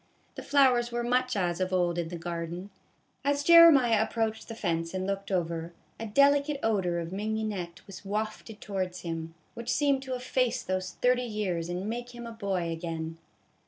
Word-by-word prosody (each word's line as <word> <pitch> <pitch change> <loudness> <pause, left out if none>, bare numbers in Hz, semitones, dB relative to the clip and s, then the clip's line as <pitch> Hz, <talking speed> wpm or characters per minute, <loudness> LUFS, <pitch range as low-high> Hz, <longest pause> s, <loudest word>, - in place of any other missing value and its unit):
The - - -7
flowers 255 -4 +3
were 240 0 -1
much 250 +1 +1
as 175 -3 0
of 185 0 0
old 175 -2 +1
in 170 - -2
the 175 - -6
garden. 170 +3 -5 0.5
As 285 0 +1
Jeremiah 330 -7 +8
ap 220 - 0
proached 220 -1 -1
the 225 - -7
fence 165 -4 -2
and 185 0 -2
looked 195 0 -3
over, 170 -2 -2 0.3
a 225 - -4
delicate 280 +4 +3
odor 190 -6 +1
of 170 0 -4
mignonette 205 -4 -3
was 195 -1 -10
wafted 215 +1 -4
towards 185 -3 -4
him, 165 -1 -5 0.2
which 235 +1 -7
seemed 280 0 +2
to 260 -1 -4
efface 250 0 0
those 185 -1 -2
thirty 250 0 +4
years 200 -8 -2
and 180 +3 -3
make 240 +2 -5
him 240 0 -7
a 230 - -6
boy 195 -6 -2
again. 165 -1 -5
205 Hz, 180 wpm, -29 LUFS, 175-240 Hz, 0.5 s, Jeremiah